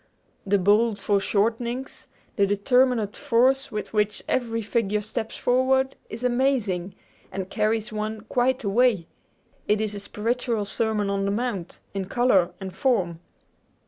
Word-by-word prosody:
The 200 +1 +4
bold 210 +3 +3
foreshortenings, 225 +6 -1 0.3
the 200 -1 +3
determinate 225 +1 +2
force 270 0 +2
with 215 0 -5
which 210 -1 0
every 230 -3 -1
figure 210 -1 0
steps 220 +1 -4
forward, 265 +1 +2
is 225 +3 -7
amazing, 240 -8 0 0.4
and 190 0 -5
carries 215 +1 0
one 215 0 -3
quite 245 +3 0
away! 210 -3 +2 0.6
It 210 0 +3
is 215 -1 -2
a 205 - -5
spiritual 230 +1 -2
Sermon 210 -1 0
on 195 0 0
the 200 - 0
Mount, 205 -5 -3
in 195 -1 -2
color 195 -4 +3
and 190 -1 -7
form. 190 - +1
220 Hz, 135 wpm, -25 LUFS, 200-245 Hz, 0.6 s, The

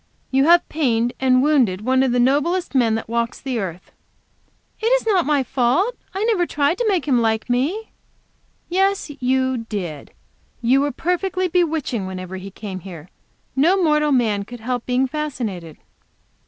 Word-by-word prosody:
You 270 +1 +3
have 345 +2 +5
pained 245 -6 0
and 255 -1 +3
wounded 255 -11 +2
one 260 +3 +2
of 265 -2 +2
the 245 - +1
noblest 295 +9 +1
men 235 -5 +3
that 225 - -4
walks 235 +1 -2
the 260 -4 -3
earth." 180 -3 -6 0.9
"It 440 - -1
is - - +2
not 380 -8 +2
my 290 -3 +2
fault. 270 - +1 0.2
I 390 - -1
never 400 -7 +1
tried 290 +5 0
to 480 - +1
make 360 -7 0
him 250 -4 +3
like 220 +1 0
me." 315 - -1 0.8
"Yes, 385 -2 0
you 260 0 +1
did. 175 -9 -5 0.5
You 250 +3 +3
were 290 0 0
perfectly 365 +5 -1
bewitching 320 - 0
whenever 185 0 -6
he 190 +1 -8
came 195 -1 -7
here. 175 -2 -10 0.5
No 330 +8 +4
mortal 300 -4 +2
man 220 -6 +1
could 240 +3 -10
help 245 +1 -3
being 255 +1 +2
fascinated." 240 - -4
260 Hz, 165 wpm, -21 LUFS, 225-325 Hz, 0.9 s, have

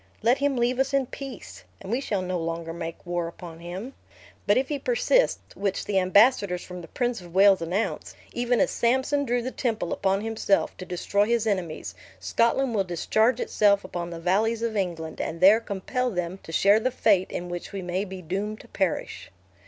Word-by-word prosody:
Let 240 +4 +4
him 280 -1 +1
leave 245 +2 +1
us 270 +1 +1
in 275 -1 +2
peace, 270 0 -9 0.2
and 195 - -8
we 245 +3 0
shall 200 -8 -2
no 180 -1 -2
longer 165 0 -4
make 165 -1 -7
war 175 -1 -2
upon 170 -1 -10
him. 185 +10 -7 0.5
But 205 - +5
if 260 +1 +1
he 290 -1 -2
persist - - +2 0.2
(which 195 -1 -2
the 195 -2 +2
ambassadors 195 -1 +4
from 180 -1 -8
the 165 - -10
Prince 245 +3 -2
of 175 0 -13
Wales 195 -1 +6
announce), 180 +6 -2 0.2
even 245 0 +1
as 280 - +2
Samson 265 +4 +1
drew 245 -1 0
the 255 - -3
temple 220 -10 -2
upon 195 +1 0
himself, 220 -2 0
to 185 - -7
destroy 200 +3 0
his 235 -1 +1
enemies, 170 - -2 0.3
Scotland 230 - +1
will 200 -3 +2
discharge 220 +7 +1
itself 200 -4 +3
upon 175 -2 -5
the 170 -1 -7
valleys 220 +7 +1
of 230 -1 -1
England; 170 -5 -3
and 165 - -4
there 200 +5 +7
compel 230 +4 -2
them 180 -2 -3
to - - -10
share 200 +6 +5
the 255 - 0
fate 200 -6 +2
in 175 - -4
which 175 0 -6
we 195 -2 -5
may 180 +2 -1
be 190 -2 -8
doomed 200 +6 -3
to - - -16
perish." 190 -4 -2
200 Hz, 200 wpm, -26 LUFS, 180-235 Hz, 0.5 s, there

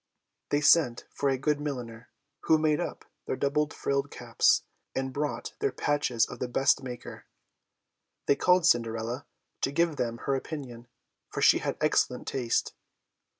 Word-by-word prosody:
They 145 - +1
sent 145 -5 +4
for 140 - 0
a 135 - +1
good 145 +2 0
milliner 120 -6 -5 0.4
to 160 - +6
make 155 -1 +2
up - - -5 0.2
their - - -1
double 150 +2 0
frilled 140 -2 -1
caps, - - +2 0.3
and 130 0 -2
bought 150 +2 -3
their 420 -1 +1
patches 145 -6 +1
of - - -9
the 125 - -2
best 135 +3 +2
maker. 125 -3 -8 1.0
They 140 - +4
called 180 +1 +3
Cinderella 115 -1 +1 0.3
to 135 - +1
give 165 0 +1
them 115 -1 -2
her 140 - +1
opinion, 130 -4 -5 0.4
for - - -3
she - - +6
had - - -3
excellent - - +1
taste. 120 -3 -1
140 Hz, 150 wpm, -28 LUFS, 120-150 Hz, 1.0 s, to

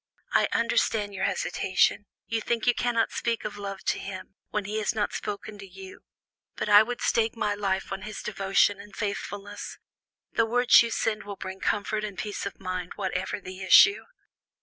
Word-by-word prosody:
I - - +4
understand 220 -3 +1
your 190 0 -1
hesitation; - - +1 0.2
you 225 -1 -2
think 230 0 -1
you 245 - +5
cannot 235 -1 0
speak 230 -1 -2
of 205 - -5
love 195 -1 -6
to - - 0
him, 190 -1 -8 0.2
when 210 -1 -2
he 210 +2 -2
has 215 - -1
not 210 -1 -1
spoken 210 0 -5
to 200 - -9
you; 190 0 -11 0.6
but - - -3
I 205 0 +8
would 245 +2 -3
stake 225 0 +1
my 210 -2 0
life 195 -2 -2
on 195 0 -4
his 215 +1 -7
devotion 195 0 +2
and 205 0 -14
faithfulness. 205 -1 -5 0.5
The 230 - +2
words 245 +1 +6
you 235 - 0
send 220 -1 -1
him - - -14
will 200 - -5
bring 190 0 -7
comfort 210 +2 -1
and 205 -2 -5
peace 205 -1 -4
of 200 - -9
mind, 185 -2 -4
whatever 190 +1 -2
the 185 0 -9
issue." 390 - +6
205 Hz, 190 wpm, -27 LUFS, 195-220 Hz, 0.6 s, I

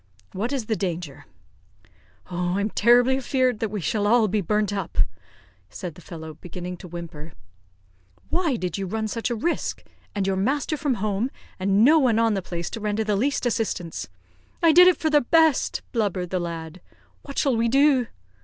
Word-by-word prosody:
"What 220 +7 -3
is 265 -5 -2
the 220 - 0
danger?" 175 -7 -4 1.1
"Oh, 180 +1 -1
I'm 200 +1 -1
terribly 245 +4 +4
afear'd 255 -3 +1
that 225 -2 -1
we 210 0 -3
shall 205 +7 0
all 225 0 +4
be 210 +1 0
burnt 210 +2 0
up," 195 -4 -4 0.7
said 175 - -6
the 175 - -14
fellow, 160 -2 -8
beginning 180 0 -6
to 180 - -10
whimper. 165 -3 -8 1.0
"Why 335 -6 +1
did 180 -3 -3
you 195 - -3
run 220 +3 -2
such 230 +3 -2
a 240 - -1
risk, 335 +10 -2 0.3
and 200 -2 0
your 190 0 0
master 275 +9 0
from 285 -4 0
home, 215 +3 -1 0.3
and 195 +3 +3
no 315 +4 +6
one 245 -6 +3
on 225 -1 +3
the 195 - -1
place 175 -1 -5
to 225 - -5
render 210 +1 -1
the 210 -1 0
least 265 +6 0
assistance?" 215 -8 -2 0.5
"I 330 - +7
did 360 +3 +8
it 365 - +5
for 315 - 0
the 295 -1 +5
best," 320 +2 +2
blubbered 195 -6 -1
the 185 - 0
lad. 165 0 -6 0.4
"What 280 - -10
shall 270 -4 +2
we 230 +1 +1
do?" 270 -1 +4
215 Hz, 185 wpm, -24 LUFS, 180-250 Hz, 1.1 s, did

